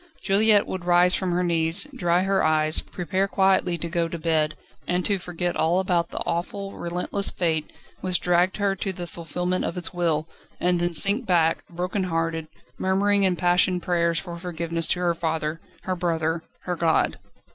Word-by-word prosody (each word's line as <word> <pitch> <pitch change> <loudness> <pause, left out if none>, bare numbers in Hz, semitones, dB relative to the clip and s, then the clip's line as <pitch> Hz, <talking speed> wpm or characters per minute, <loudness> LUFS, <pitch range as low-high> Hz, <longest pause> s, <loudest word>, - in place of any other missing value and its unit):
Juliette 205 +1 +4
would 185 -2 -5
rise 175 +1 +5
from 185 -1 0
her 180 +1 +1
knees, 165 - +1
dry 175 -4 +1
her 195 0 +1
eyes, 155 0 +3
prepare 185 +2 -2
quietly 190 -3 +2
to 170 - -4
go 170 0 0
to 170 - -5
bed, 155 -2 0 0.3
and 180 0 0
to 200 -2 +1
forget 175 0 -3
all 170 +3 +2
about 175 -3 0
the - - -8
awful, 195 +3 -3
relentless 180 +3 -2
Fate 160 -3 -1 0.3
which 185 -2 +1
dragged 180 +1 +2
her 200 -2 +1
to 195 +1 -3
the 180 -1 -6
fulfilment 175 +2 -3
of 170 - -3
its 180 - -2
will, 165 -3 0 0.3
and 180 0 +1
then 175 0 -1
sink 205 - +4
back, 165 -3 +2
broken 180 +3 -2
hearted, 165 -2 -2 0.3
murmuring 200 +2 +2
impassioned 180 -1 +2
prayers 170 -1 +1
for 175 -1 -5
forgiveness 170 -1 -2
to 180 - +1
her 175 -1 +2
father, 160 -1 -2 0.2
her 185 - -2
brother, 165 -2 -1 0.2
her 180 - -3
God. 165 -1 +1
175 Hz, 175 wpm, -24 LUFS, 165-185 Hz, 0.3 s, rise